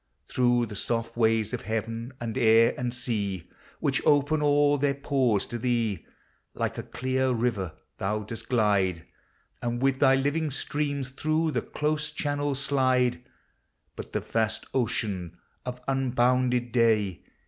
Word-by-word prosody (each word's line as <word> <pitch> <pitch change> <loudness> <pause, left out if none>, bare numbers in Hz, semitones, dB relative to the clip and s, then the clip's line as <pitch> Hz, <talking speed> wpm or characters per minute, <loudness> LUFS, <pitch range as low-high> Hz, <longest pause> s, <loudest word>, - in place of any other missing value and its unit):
Through 120 -1 +2
the 105 -2 -8
soft 115 +2 -2
ways 110 -1 +2
of 125 - -2
heaven, 115 +3 -3
and 115 -2 -4
air, 115 -1 +5
and 125 -1 -2
sea, 105 -8 -2 0.3
Which - - +1
open 145 +1 +3
all 145 0 +3
their 140 0 +1
pores 135 -7 +1
to 120 - -5
thee, 115 -7 -1 0.5
Like - - -2
a - - -1
clear 130 +1 -1
river 115 -8 -1 0.3
thou 105 +2 -1
dost 115 +2 -7
glide, 100 -8 +2 0.6
And 120 0 -2
with 135 0 +1
thy 135 -1 +5
living 145 +4 0
stream 145 +1 -1
through 155 +5 0
the - - 0
close 150 0 -2
channels 145 -2 -1
slide. 130 -3 +2 0.7
But - - -8
the - - -1
vast 110 -1 -1
ocean 105 -8 -1 0.3
of 125 0 -4
unbounded 125 -2 +1
day. 110 -6 +2
125 Hz, 140 wpm, -27 LUFS, 110-135 Hz, 0.7 s, air